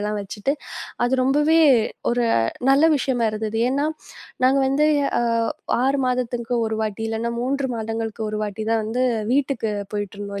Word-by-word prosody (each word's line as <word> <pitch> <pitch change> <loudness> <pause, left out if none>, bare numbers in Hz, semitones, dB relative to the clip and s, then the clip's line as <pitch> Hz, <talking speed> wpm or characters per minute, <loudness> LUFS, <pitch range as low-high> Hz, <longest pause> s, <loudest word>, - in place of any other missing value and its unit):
எல்லாம் 210 0 -2
வச்சிட்டு, 210 +7 -2 0.5
அது 255 +1 +1
ரொம்பவே 295 +5 +3 0.5
ஒரு 240 0 +1 0.5
நல்ல 285 +4 +5
விஷயமா 250 -3 0
இருந்தது. 220 +1 -2
ஏன்னா 285 +3 0 0.6
நாங்க 265 +2 +4
வந்து 295 +3 +2 0.3
அ - - +1 0.6
6 275 +1 +2
மாதத்துக்கு 245 -1 -1
ஒரு 220 0 -2
வாட்டி 215 +1 -3
இல்லன்னா 225 +1 -2
3 270 +1 -1
மாதங்களுக்கு 225 0 -4
ஒரு 215 - -3
வாட்டித் 215 +2 -4
தான் 225 -1 +1
வந்து 245 +4 -1 0.3
வீட்டுக்கு 265 -5 0 0.2
போயிட்டு 205 -1 -4
இருந்தோம் 200 -1 -5
235 Hz, 150 wpm, -22 LUFS, 215-270 Hz, 0.6 s, நல்ல